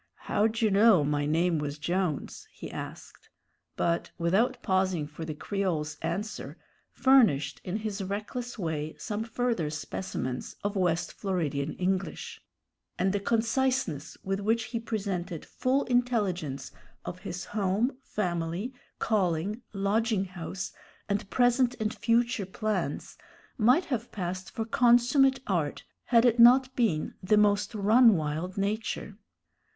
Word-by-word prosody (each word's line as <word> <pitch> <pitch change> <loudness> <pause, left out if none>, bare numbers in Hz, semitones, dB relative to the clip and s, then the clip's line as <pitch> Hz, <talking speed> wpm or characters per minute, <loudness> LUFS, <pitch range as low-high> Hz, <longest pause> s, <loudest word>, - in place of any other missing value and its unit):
"How 210 +2 +2
d'dyou 225 -1 0
know 200 -4 +6
my 145 0 0
name 165 +1 +2
was 145 0 -3
Jones?" 175 0 -2
he - - -9
asked; - - -9 0.5
but, 170 0 0
without 190 +9 +2
pausing 185 -4 +1
for 150 +2 -8
the 155 -1 -5
Creole's 160 -5 -2
answer, 190 +7 -4 0.3
furnished 170 - +3
in 185 +3 -2
his 210 -2 -4
reckless 215 +5 -4
way 155 -5 -3
some 215 -1 -3
further 230 -8 -1
specimens 145 -4 -4
of 205 +1 -1
West 175 -3 0
Floridian 155 -7 -2
English; 190 +1 -2 0.6
and 190 +1 +1
the 205 - +1
conciseness 225 - 0
with 195 0 -1
which 225 +3 +1
he 230 - 0
presented 195 -7 -3
full 265 +2 0
intelligence 200 - 0 0.3
of 180 - -6
his 180 -2 -6
home, 205 +4 0
family, 180 +2 -2 0.2
calling, 195 +1 0
lodging 205 +1 +1
house, 180 0 -6 0.3
and 200 0 -2
present 245 0 +3
and 215 0 -1
future 235 -3 +1
plans, 195 -6 -3 0.4
might 250 +10 +4
have 240 -4 -3
passed 185 -1 -4
for 225 -3 -4
consummate 245 +4 +4
art, 165 -7 -1 0.2
had 235 -1 +4
it 240 -1 +3
not 255 +2 +7
been 205 -11 +1
the 210 +3 +3
most 205 +1 +2
run 220 +2 +6
wild 160 +5 -3
nature. 210 0 -2
200 Hz, 130 wpm, -28 LUFS, 170-230 Hz, 0.6 s, not